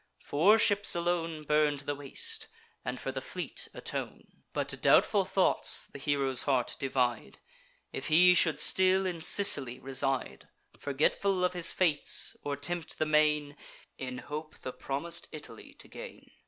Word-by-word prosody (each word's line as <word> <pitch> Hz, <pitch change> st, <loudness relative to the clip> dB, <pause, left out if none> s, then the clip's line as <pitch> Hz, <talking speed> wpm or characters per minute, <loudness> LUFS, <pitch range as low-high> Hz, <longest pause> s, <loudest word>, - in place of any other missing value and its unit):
Four 190 Hz, +10 st, +3 dB
ships 205 Hz, -3 st, +4 dB
alone 170 Hz, -2 st, -2 dB
Burn 150 Hz, -1 st, +1 dB
to 140 Hz, -, -8 dB
the 145 Hz, -, -2 dB
waist, 140 Hz, -1 st, -4 dB, 0.4 s
and 125 Hz, +1 st, -5 dB
for 135 Hz, -, -5 dB
the 130 Hz, 0 st, -6 dB
fleet 180 Hz, +6 st, -7 dB
atone. -, -, -8 dB
But -, -, -3 dB
doubtful 200 Hz, -3 st, +3 dB
thoughts 190 Hz, 0 st, +2 dB
the -, -, -9 dB
hero's 135 Hz, -3 st, +1 dB
heart 130 Hz, -4 st, -1 dB
divide; 125 Hz, -, -2 dB, 0.6 s
If 135 Hz, -, -5 dB
he 180 Hz, +3 st, +5 dB
should 160 Hz, -4 st, +2 dB
still 190 Hz, +3 st, +3 dB
in 175 Hz, -3 st, -4 dB
Sicily 140 Hz, -10 st, +4 dB
reside, 135 Hz, 0 st, -2 dB, 0.3 s
Forgetful 180 Hz, +7 st, -1 dB
of 180 Hz, -, 0 dB
his 175 Hz, -1 st, +3 dB
fates, 160 Hz, -6 st, +2 dB
or 145 Hz, -1 st, -4 dB
tempt 170 Hz, +3 st, -3 dB
the 155 Hz, -, 0 dB
main, 150 Hz, -1 st, +1 dB, 0.4 s
In 125 Hz, -1 st, -6 dB
hope 155 Hz, +3 st, -8 dB
the 130 Hz, -, -7 dB
promis'd 145 Hz, +5 st, -5 dB
Italy -, -, -12 dB
to -, -, -11 dB
gain. -, -, -12 dB
150 Hz, 150 wpm, -29 LUFS, 135-180 Hz, 0.6 s, he